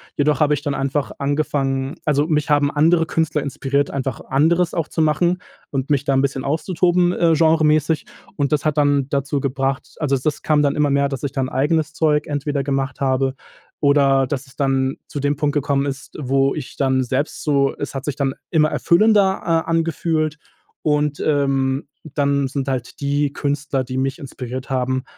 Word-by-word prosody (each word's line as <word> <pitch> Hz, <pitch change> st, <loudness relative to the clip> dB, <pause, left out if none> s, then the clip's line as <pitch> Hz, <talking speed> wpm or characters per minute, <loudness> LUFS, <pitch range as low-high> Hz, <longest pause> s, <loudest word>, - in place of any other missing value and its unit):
jedoch 150 Hz, +1 st, +1 dB
habe 150 Hz, -1 st, +3 dB
ich 145 Hz, -, -7 dB
dann 145 Hz, -2 st, -1 dB
einfach 140 Hz, +1 st, -1 dB
angefangen 140 Hz, -1 st, -1 dB
also, 145 Hz, -1 st, +2 dB
mich 150 Hz, -2 st, 0 dB
haben 145 Hz, -1 st, +3 dB
andere 165 Hz, +3 st, +3 dB
Künstler 155 Hz, -2 st, 0 dB
inspiriert, 140 Hz, 0 st, -1 dB
einfach 135 Hz, -2 st, -3 dB
anderes 165 Hz, +6 st, +2 dB
auch 165 Hz, -2 st, -1 dB
zu 160 Hz, -, -2 dB
machen 170 Hz, +4 st, +2 dB, 0.3 s
und 135 Hz, +1 st, -3 dB
mich 145 Hz, -1 st, +1 dB
da 140 Hz, -, +2 dB
'n 135 Hz, -, +3 dB
bisschen 135 Hz, -1 st, -1 dB
auszutoben, 175 Hz, +4 st, +1 dB
äh, 170 Hz, -2 st, +3 dB
genremäßig. 155 Hz, -1 st, +3 dB, 0.3 s
Und 140 Hz, 0 st, -1 dB
das 150 Hz, -1 st, 0 dB
hat 155 Hz, -1 st, 0 dB
dann 145 Hz, -2 st, +2 dB
dazu 140 Hz, +1 st, -1 dB
gebracht 135 Hz, 0 st, -2 dB
also, 140 Hz, -3 st, +1 dB
das 150 Hz, +4 st, -2 dB
kam 150 Hz, -1 st, +2 dB
dann 140 Hz, -, +1 dB
immer 150 Hz, -1 st, +2 dB
mehr, 140 Hz, 0 st, +2 dB
dass 135 Hz, -2 st, -5 dB
ich 140 Hz, -, -2 dB
dann 135 Hz, -2 st, -1 dB
eigenes 150 Hz, +4 st, 0 dB
Zeug 150 Hz, -2 st, +1 dB
entweder 145 Hz, -1 st, -2 dB
gemacht 135 Hz, -1 st, -2 dB
habe 135 Hz, 0 st, +1 dB, 0.4 s
oder 140 Hz, -2 st, +4 dB
das 135 Hz, +1 st, -4 dB
es 130 Hz, -, -19 dB
dann 135 Hz, -1 st, 0 dB
zu 145 Hz, -, -5 dB
dem 145 Hz, +1 st, 0 dB
Punkt 145 Hz, 0 st, 0 dB
gekommen 140 Hz, -1 st, 0 dB
ist, 140 Hz, 0 st, -6 dB
wo 135 Hz, 0 st, +1 dB
ich 145 Hz, -5 st, -7 dB
dann 130 Hz, -1 st, +2 dB
selbst 130 Hz, +4 st, -2 dB
so 140 Hz, -2 st, +2 dB
äh, -, -, -32 dB
es 145 Hz, -, -4 dB
hat 135 Hz, -1 st, -5 dB
sich 145 Hz, -, -2 dB
dann 135 Hz, -2 st, -1 dB, 0.2 s
immer 155 Hz, -2 st, +3 dB
erfüllender 195 Hz, +1 st, +3 dB
a 165 Hz, -1 st, +3 dB
angefühlt 160 Hz, -2 st, -1 dB, 0.4 s
und, 150 Hz, -1 st, 0 dB
ähm, 135 Hz, -1 st, +1 dB, 0.3 s
dann 140 Hz, -1 st, +1 dB
sind 135 Hz, 0 st, -3 dB
halt 130 Hz, 0 st, -4 dB
die 145 Hz, 0 st, 0 dB
Künstler, 145 Hz, -2 st, -1 dB
die 130 Hz, +1 st, -5 dB
mich 135 Hz, +4 st, -1 dB
inspiriert 130 Hz, -2 st, -7 dB
haben, 130 Hz, 0 st, -1 dB
145 Hz, 190 wpm, -20 LUFS, 135-150 Hz, 0.4 s, oder